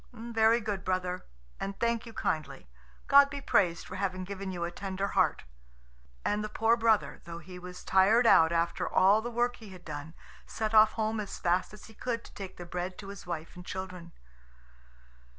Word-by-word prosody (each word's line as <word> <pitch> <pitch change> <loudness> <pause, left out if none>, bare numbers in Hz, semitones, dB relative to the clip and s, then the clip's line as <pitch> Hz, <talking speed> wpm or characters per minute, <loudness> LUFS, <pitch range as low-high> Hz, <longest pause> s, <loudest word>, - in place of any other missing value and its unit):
"Very 230 0 +2
good, 205 -3 -3
brother, 185 -1 -2 0.3
and 195 0 -5
thank 235 0 0
you - - -8
kindly. 155 - -3 0.4
God 280 0 +7
be 285 0 -5
praised 180 -10 +1
for 185 - -7
having 185 -1 -2
given 195 0 -5
you 175 -2 -4
a 170 - -2
tender 195 +2 -3
heart." - - +2 0.8
And 210 +1 0
the 215 - -4
poor 225 +2 +3
brother, 225 -2 +1
though 170 -1 -7
he 180 +2 -10
was 180 0 -9
tired 210 +6 +4
out 165 -7 +6
after 170 0 0
all 200 +3 +5
the 240 - -4
work 240 +1 0
he 220 -3 -12
had 185 -2 -13
done, 155 +1 -7 0.3
set 220 0 -3
off 215 0 +7
home 220 0 -1
as 205 -2 -5
fast 175 +1 +1
as 210 - -12
he 220 - -14
could 230 +1 -3
to - - -15
take 195 -2 -8
the 175 - -7
bread 180 +1 -4
to 195 - -9
his 200 -2 -10
wife 165 -2 -5
and 180 - -9
children. 185 -2 -7
195 Hz, 195 wpm, -30 LUFS, 180-220 Hz, 0.8 s, God